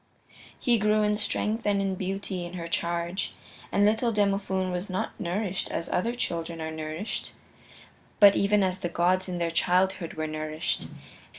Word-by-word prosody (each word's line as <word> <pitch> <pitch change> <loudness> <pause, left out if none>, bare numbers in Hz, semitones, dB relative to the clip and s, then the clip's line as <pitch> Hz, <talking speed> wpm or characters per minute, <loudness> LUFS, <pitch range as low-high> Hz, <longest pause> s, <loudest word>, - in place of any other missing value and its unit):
He 240 -3 +3
grew 215 +1 +3
in 210 0 +2
strength 220 +2 0
and 195 -2 +1
beauty 190 0 -3
in 175 0 -7
her 170 -2 -5
charge. 170 +2 -2 0.4
And 205 - +4
little 220 +3 +3
Demophoon 195 -3 +1
was 180 +2 -3
not 185 - -2
nourished 185 +1 -1
as 165 - -3
other 230 +7 0
children 170 -8 -3
are 160 0 -3
nourished, 160 +6 -4 0.9
but 200 -1 +9
even 200 0 +3
as 185 0 0
the 175 - -2
gods 185 +2 +2
in 180 - -2
their 170 -1 0
childhood 180 0 +1
were 155 0 -2
nourished. 155 0 -3
185 Hz, 160 wpm, -27 LUFS, 170-205 Hz, 0.9 s, but